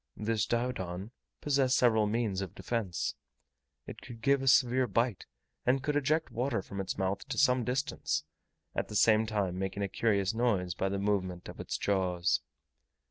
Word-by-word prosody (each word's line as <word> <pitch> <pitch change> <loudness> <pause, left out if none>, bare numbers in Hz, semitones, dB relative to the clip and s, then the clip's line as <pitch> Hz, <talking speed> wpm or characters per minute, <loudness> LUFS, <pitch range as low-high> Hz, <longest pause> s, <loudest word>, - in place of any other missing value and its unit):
This 110 0 0
Diodon 110 -5 -2 0.3
possessed 135 -3 +2
several 110 -4 +4
means 105 -3 0
of 95 - -6
defence. 110 -8 -2 0.7
It - - -9
could 120 -3 -10
give 140 -1 +3
a 135 - -3
severe 130 0 +4
bite, 115 0 0 0.4
and 130 +1 +2
could 150 +1 0
eject 155 +3 +1
water 120 -4 -1
from 100 0 -5
its 95 - -4
mouth 95 +1 -1
to 135 - -4
some 125 -3 +4
distance, 125 - -1 0.5
at - - -2
the 105 - -7
same 110 +1 +4
time 100 -4 -1
making 95 +1 -2
a - - 0
curious 100 -1 +1
noise 105 -7 +1
by 95 +2 -1
the 100 - -2
movement 95 -3 -1
of - - -10
its - - -3
jaws. 90 -3 +1
110 Hz, 170 wpm, -31 LUFS, 95-125 Hz, 0.7 s, several